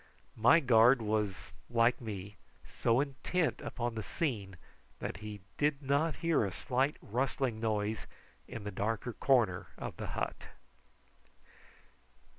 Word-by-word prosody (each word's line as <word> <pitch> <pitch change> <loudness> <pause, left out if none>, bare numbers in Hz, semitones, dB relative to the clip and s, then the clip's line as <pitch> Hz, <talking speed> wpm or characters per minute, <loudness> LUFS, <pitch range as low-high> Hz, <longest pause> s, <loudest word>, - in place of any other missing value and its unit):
My 125 +9 +7
guard 125 -1 +6
was, 105 -5 -2 0.2
like 120 +1 +3
me, 105 -3 -6 0.3
so 115 - +2
intent 145 +4 -1
upon 120 -2 -3
the 110 - -3
scene 105 - -3 0.4
that - - -4
he 105 0 -7 0.2
did 145 -1 +2
not 140 +4 +2
hear 165 -7 +4
a 100 - -1
slight 130 +8 0
rustling 125 0 -1
noise 110 -2 -1 0.4
in 115 - -7
the 105 - -4
darker 110 +4 -2
corner 115 -8 +2
of - - -6
the - - -4
hut. - - -3
115 Hz, 125 wpm, -33 LUFS, 105-135 Hz, 0.4 s, My